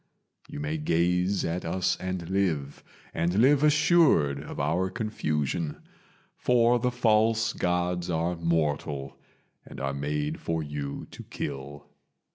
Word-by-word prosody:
You - - -7
may 75 +2 -2
gaze 90 +5 +1
at 85 +2 -2
us 90 +2 0
and 90 -2 -4
live, 85 -7 -1 0.3
and 85 +2 0
live 135 +6 +5
assured 150 - +4
of 75 - -8
our 95 +3 +1
confusion: 80 - -2 0.6
For 120 0 +3
the 125 - +1
False 110 -2 +2
Gods 90 0 -1
are 85 +1 0
mortal, 75 -4 -1 0.5
and - - -11
are 70 0 -2
made 75 +2 -2
for 80 -1 -2
you 75 -1 -5
to - - -9
kill. 70 +1 -6
85 Hz, 125 wpm, -27 LUFS, 75-100 Hz, 0.6 s, live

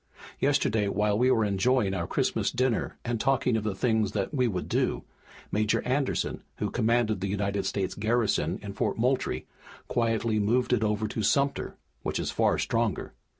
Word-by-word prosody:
Yesterday, 105 -1 +2
while 105 +1 +1
we 125 +4 +3
were 110 -4 +3
enjoying 105 +1 +2
our 85 -3 -2
Christmas - - 0
dinner 130 -2 0
and 120 -2 -1
talking 130 -3 +2
of 110 - 0
the 105 -3 -2
things 110 -2 +1
that 100 +3 -2
we 130 -3 +2
would 95 -5 -3
do, - - 0 0.5
Major 105 +1 +2
Anderson, 130 +2 -1
who - - -3
commanded 115 -3 +1
the 100 - -1
United 100 0 -1
States 95 -2 -1
garrison 110 -5 +1
in 100 -1 -6
Fort - - -1
Moultrie, 125 +3 0 0.4
quietly 115 -2 +1
moved 120 +5 +2
it 115 -3 +2
over 105 0 0
to 110 - -3
Sumter, 140 +6 +1 0.3
which - - -2
is - - -2
far - - +2
stronger. - - -1
110 Hz, 170 wpm, -28 LUFS, 100-120 Hz, 0.5 s, we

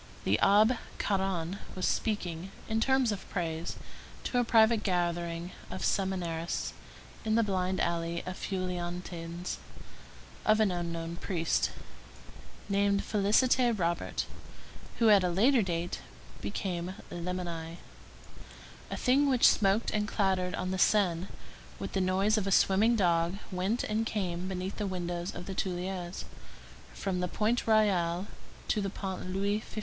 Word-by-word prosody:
The 100 +3 +2
Abbé 215 +4 +5 0.2
Caron 190 -2 -1 0.2
was 185 - 0
speaking, 185 -5 -1 0.2
in 220 0 0
terms 265 -2 +3
of 205 - -6
praise, 165 -2 -3 0.5
to 245 - 0
a - - +3
private 225 -1 +5
gathering 175 -1 -1 0.2
of - - -3
seminarists 175 -4 -1 0.5
in 220 0 +1
the 230 - +4
blind 185 -2 0
alley 170 0 -1
of 185 - -4
Feuillantines, 175 -2 -4 0.9
of 215 0 +4
an 215 -3 +4
unknown 170 -1 -3
priest, 170 -4 0 1.0
named 200 0 +2
Félicité 230 +3 +3
Robert, 170 -2 -1 0.7
who, 230 -2 +5
at 200 -2 +6
a 180 - +2
latter 230 +9 +4
date, 175 -2 -2 0.4
became 175 - -3 0.2
Lamennais. 170 -2 -4 1.1
A - - -3
thing 280 +3 +3
which 255 -3 +6
smoked 200 +2 +3
and 210 0 0
clattered 190 -3 +1
on 185 0 -2
the 190 - -2
Seine 185 -3 +3 0.5
with - - -5
the 195 - +1
noise 195 +4 +2
of 200 - -3
a - - 0
swimming 205 +5 +4
dog 175 -2 +2
went 190 +6 0
and 220 +1 0
came 185 -4 -2
beneath 185 0 -4
the 210 - -1
windows 175 -1 -3
of 175 - -6
the 195 - -5
Tuileries, 180 -1 -3 0.7
from 190 -2 -2
the 180 - 0
Pont 225 +6 0
Royal 190 -5 +3 0.4
to 210 - +1
the 195 - -1
Pont 190 -1 -5
Louis 200 +2 0
XV. 220 - -13
185 Hz, 140 wpm, -30 LUFS, 175-210 Hz, 1.1 s, at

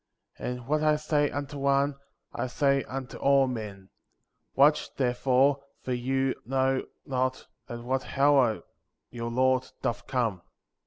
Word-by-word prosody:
And 125 -1 -4
what 150 +3 +1
I 155 0 +4
say 150 -1 +1
unto 145 0 -5
one, 140 +1 +2 0.4
I - - -2
say 140 +1 +2
unto 130 -1 -6
all 140 -1 +4
men; 105 -6 -6 0.6
watch, 145 +3 +4
therefore, 135 +2 +2 0.2
for 130 - -2
you 130 +2 0
know 130 +1 0 0.2
not 130 -1 -1 0.2
at 120 0 -6
what 130 +2 -3
hour 135 -5 +4 0.5
your 115 -1 -4
Lord 130 +1 +2
doth 115 - -2
come. 115 -8 -1
130 Hz, 135 wpm, -28 LUFS, 125-140 Hz, 0.6 s, I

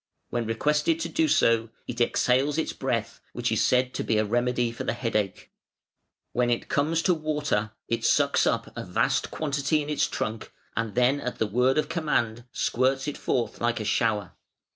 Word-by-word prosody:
When 120 -2 -1
requested 150 +7 +1
to 165 - -2
do 160 0 +2
so, 115 -5 +3 0.2
it - - -3
exhales 130 +4 +2
its 160 - -1
breath, - - -2
which - - -1
is - - +2
said 125 0 +2
to - - -2
be 110 - +1
a 110 - +2
remedy 120 +2 +1
for 115 - -6
the - - -1
headache. 105 -6 -2 0.8
"When 125 0 +2
it 120 - -1
comes 160 +3 +1
to 185 - +4
water, 150 -9 -1
it 115 - -1
sucks - - +3
up - - -1
a - - -4
vast - - 0
quantity 145 0 0
in 150 - -5
its 150 - +2
trunk, 110 0 -4 0.2
and 115 -2 -2
then 125 +3 +3
at 125 - -4
the - - +1
word 125 +6 +2
of 155 - +1
command 120 -8 -1
squirts 130 +3 0
it 145 - -2
forth 115 -4 -2
like 120 0 +1
a 110 - -4
shower. 105 -2 +1
125 Hz, 185 wpm, -26 LUFS, 115-150 Hz, 0.8 s, to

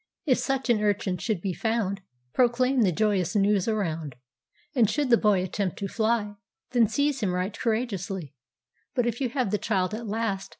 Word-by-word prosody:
"If 260 -5 +3
such 270 -1 -1
an 215 -3 +2
urchin 200 -3 0
should 210 -7 -1
be 190 -1 -2
found, 210 -2 -1 0.3
Proclaim 250 +1 +3
the 195 -5 +4
joyous 190 -1 +1
news 200 -1 +3
around; 165 - -2 0.6
And 235 -6 +4
should 290 -4 0
the - - +9
boy 205 -5 +3
attempt 185 0 -2
to 200 - -3
fly, 215 -1 0 0.3
Then 240 -3 +4
seize 285 +3 0
him 190 -6 0
right 185 +3 -2
courageously. 195 - -2 0.6
But 245 -2 +2
if 240 +2 -2
you 255 - +1
have 250 -5 -1
the 210 - +1
child 190 -2 0
at 225 +1 -5
last. 210 -2 -2
210 Hz, 180 wpm, -26 LUFS, 195-235 Hz, 0.6 s, the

